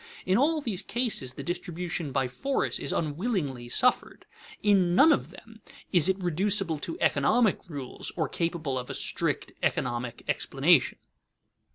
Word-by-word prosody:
In 185 - +2
all 300 +6 +2
these 210 -8 -1
cases 215 - -2
the - - -7
distribution 175 -3 -4
by 130 0 0
force 270 - -2
is - - -1
unwillingly 150 - -2
suffered. 250 - +2 0.4
In 190 -4 +3
none 310 - +7
of 290 - +1
them 225 -1 -15 0.3
is 175 -2 +4
it 190 - +1
reducible 180 -2 +1
to 165 - -6
economic 215 - +2
rules 140 -5 -5
or 160 -4 0
capable 160 -5 -2
of 125 - -8
a - - -4
strict - - -1
economic 120 -1 -2
explanation. - - +2
175 Hz, 145 wpm, -27 LUFS, 145-210 Hz, 0.4 s, none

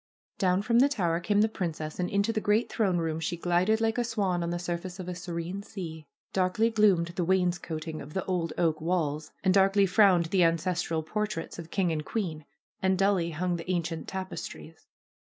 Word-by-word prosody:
Down 185 +1 +2
from 235 +2 +3
the 275 +3 +5
tower 175 -10 0
came 205 +3 +2
the 215 - +4
princess 165 -7 -4
and 180 - 0
into 200 +3 +1
the 215 - -1
great 210 +3 +1
throne 195 -6 +1
room 160 -1 -1
she 170 +2 -2
glided 180 +6 +2
like 225 +1 +1
a - - +2
swan 200 -7 0
on 170 - -2
the 175 - -1
surface 180 +2 -4
of 180 - -6
a 180 - -3
serene 175 +1 -5
sea. 165 -7 -8 0.3
Darkly 190 +5 +2
gloomed 200 -6 +3
the 175 +1 -2
wainscoting 175 -3 -1
of 145 +2 -10
the 190 - -1
old 175 -3 -1
oak 160 -2 +1
walls, 155 -3 -1
and 190 -1 +4
darkly 195 +1 +5
frowned 185 -2 +5
the 185 -2 +4
ancestral 165 -1 0
portraits 210 -1 -3
of 165 -1 -8
king 180 -1 +1
and 155 -1 -2
queen, 160 -7 -3 0.4
and 190 0 +2
dully 195 -3 +2
hung 175 +2 -1
the 165 +2 -8
ancient 165 -2 -2
tapestries. 190 -1 -7
180 Hz, 195 wpm, -28 LUFS, 165-200 Hz, 0.4 s, the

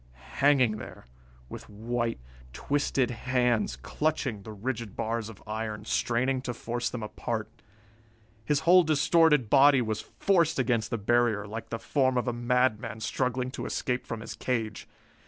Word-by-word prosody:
Hanging 130 -6 +4
there, - - -10 0.4
with - - -10
white, 115 +2 -2 0.3
twisted 135 - 0
hands 120 - 0
clutching 135 - -2
the 110 - -9
rigid 110 0 -4
bars 115 0 -2
of 110 - -13
iron, 110 0 -4
straining 125 +2 0
to 120 -2 -4
force 120 +2 -3
them 120 -3 -5
apart. 110 +1 -4 1.0
His 145 +4 +1
whole 175 +3 +7
distorted 155 -3 +3
body 140 +3 +6
was 110 -3 -2
forced 170 -5 +1
against 120 -4 +1
the 115 - -1
barrier, 110 -1 +2
like 110 +2 -7
the 115 - -3
form 130 +1 +1
of 125 - 0
a 120 - 0
madman 120 -2 0
struggling 125 +2 -1
to - - -5
escape 125 -1 -2
from 115 -1 -5
his - - -7
cage. 115 -5 -3
120 Hz, 150 wpm, -28 LUFS, 110-130 Hz, 1.0 s, whole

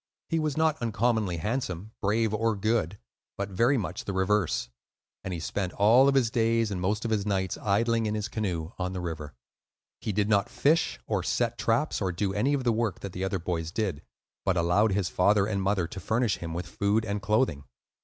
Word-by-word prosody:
He 165 - +1
was 155 -2 -1
not 160 -2 +2
uncommonly 110 -5 0
handsome, 105 0 -3
brave, 110 +2 +1
or 110 +1 +1
good, 110 -3 0 0.4
but 100 0 -3
very 120 +8 +2
much 95 -5 -4
the 100 - -3
reverse; 95 -11 +1 0.6
and 95 - -4
he 85 - -3
spent 90 +3 -3
all 115 +7 +5
of 140 - +3
his 120 -4 +3
days 115 -2 +2
and 90 -2 -3
most 105 +5 -1
of 115 - -1
his 105 -2 +1
nights 95 -2 -1
idling 115 +2 +1
in 105 - -1
his 105 0 -2
canoe 90 -7 -3
on 90 0 -2
the 95 - -3
river. 75 -5 -5 0.6
He 110 - -3
did 105 0 +1
not 100 -2 +2
fish 160 +3 +1
or - - 0
set - - 0
traps - - 0
or 95 - 0
do 95 +2 -1
any 130 +8 +2
of 135 - -2
the 120 -2 +2
work 110 -3 -1
that 100 -3 -6
the 95 - -4
other 95 0 0
boys 85 -2 -3
did, 95 -7 -2 0.4
but 95 - +1
allowed 90 +5 +3
his 95 -2 +1
father 100 +3 +3
and 100 -2 -1
mother 95 -2 +1
to 95 - -7
furnish 110 -1 0
him 85 -1 -6
with 90 +1 -3
food 100 +5 0
and 100 -1 -2
clothing. 105 - +1
105 Hz, 210 wpm, -28 LUFS, 90-115 Hz, 0.6 s, all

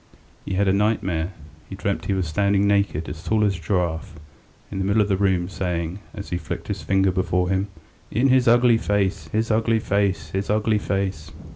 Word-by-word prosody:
He 95 - -3
had 100 +1 +2
a 95 - +4
nightmare. 95 -5 0 0.4
He - - -6
dreamt - - -2
he - - 0
was 95 -3 -1
standing 100 +4 +2
naked, 100 -6 +1
as 80 - -7
tall 110 -1 +1
as 100 -2 +2
a 90 - -9
giraffe, 85 -3 -1 0.6
in 95 - -4
the - - 0
middle 100 +3 +3
of 100 - -4
the 95 - +3
room, 95 -2 +2
and 90 +2 -6
saying, 90 -1 -3 0.2
as 100 -3 -8
he 90 - -1
flicked 80 - -6
his - - -3
finger 95 -1 +2
before 90 0 0
him: 95 +1 0 0.4
"In 125 +6 +2
his 130 -1 +4
ugly 120 -1 +5
face! 100 -6 0
his 110 +6 -1
ugly 115 +1 +2
face! 95 -7 0
his 95 +2 -2
ugly 105 0 +2
face!" 95 -6 -2
95 Hz, 210 wpm, -23 LUFS, 90-105 Hz, 0.6 s, ugly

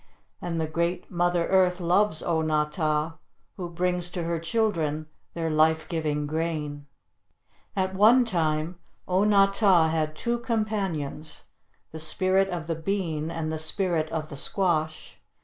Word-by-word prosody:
And 170 -2 -3
the 160 - +1
great 170 +3 -2
Mother 175 -1 +1
Earth 185 -1 +3
loves 180 0 +2
O 165 -2 +1
na 155 -1 +2
tah, 155 +1 -1 0.4
who 180 -3 -5
brings 180 0 -1
to 175 - -2
her 165 0 -1
children 165 -6 0 0.3
their 165 -1 -1
life 160 +1 +3
giving 155 -4 -1
grain. 150 -2 -3 0.9
At 190 -1 0
one 225 +6 +6
time 165 -3 -1 0.3
O 185 +2 +2
na 205 -2 +6
tah 195 -5 +4
had 155 -1 -1
two 235 +7 -1
companions, 195 - -2 0.5
the 160 - -7
Spirit 185 +5 +1
of 175 -3 -4
the 165 - -1
Bean 160 -2 -2
and 165 -1 -3
the 160 - -3
Spirit 160 -1 0
of 155 -1 -3
the 140 - -7
Squash. 160 -2 -1
170 Hz, 150 wpm, -26 LUFS, 155-185 Hz, 0.9 s, one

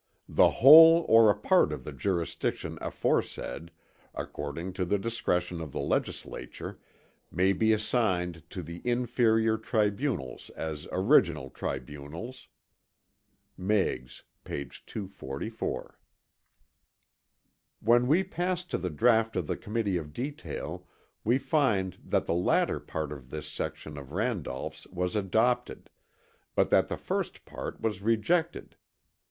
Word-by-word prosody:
The - - +5
whole 165 +5 +9
or 115 -1 +7
a 100 - +4
part - - +3
of - - -5
the - - -6
jurisdiction 90 -4 -2
aforesaid, 85 - -2 0.5
according 80 +6 -5
to 95 0 -2
the 100 +3 +1
discretion 90 -5 -1
of 75 -4 -7
the - - -3
legislature, - - -3 0.5
may 95 +2 +2
be 110 +3 +2
assigned 90 - 0
to 90 - -6
the 85 +2 -8
inferior 115 -2 +2
tribunals 110 - -1
as 80 -2 -5
original 90 - +3
tribunals." 75 - -6 1.1
Meigs, 95 -10 -1 0.2
p. 70 - -4
244. 95 - -6 1.8
When 120 +2 +4
we 165 +7 +4
pass 180 -1 -2
to - - -3
the 90 - -2
draught 115 +6 +3
of 90 - -1
the - - -2
Committee 105 -4 -1
of 75 -3 -7
Detail 145 - -5 0.4
we 120 +4 +3
find 115 - +1
that - - 0
the - - 0
latter 90 +1 +2
part 80 -2 -4
of 65 -4 -9
this 75 +1 -6
section 75 -2 -5
of 70 +1 -11
Randolph's 105 - -3
was 90 +1 -3
adopted, 110 +5 0 0.6
but - - +2
that - - +4
the - - -4
first - - -3
part - - -7
was 105 -4 -2
rejected. 160 - 0
100 Hz, 125 wpm, -29 LUFS, 85-120 Hz, 1.8 s, whole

